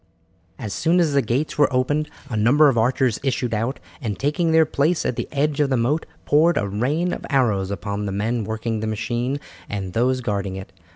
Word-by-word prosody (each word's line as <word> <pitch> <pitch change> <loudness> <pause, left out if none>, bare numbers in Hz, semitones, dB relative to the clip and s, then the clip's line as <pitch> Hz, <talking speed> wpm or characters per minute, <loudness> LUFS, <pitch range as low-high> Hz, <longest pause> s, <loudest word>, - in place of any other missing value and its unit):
As 105 -4 -5
soon 165 - +2
as 160 -4 +2
the 140 - +4
gates 135 +5 -2
were 145 - +4
opened 145 +4 0 0.2
a 120 - -4
number 135 +8 +5
of 135 - 0
archers 120 0 +1
issued 125 -3 -1
out, 115 +5 -1 0.2
and 105 -6 -3
taking 150 +4 0
their 160 0 +5
place 155 +3 0
at 125 - 0
the - - -3
edge 145 0 0
of 145 -2 +3
the 130 - +2
moat, 135 +7 0 0.2
poured 160 +4 +4
a 100 - 0
rain 140 - 0
of - - -6
arrows 110 -9 +1
upon 100 +2 -3
the - - -2
men 110 +4 -1
working 110 +1 -3
the 110 - -3
machine 120 +5 -2 0.3
and 95 -3 -4
those 125 +2 +1
guarding 100 -5 -2
it. 95 0 -9
125 Hz, 210 wpm, -22 LUFS, 110-145 Hz, 0.3 s, number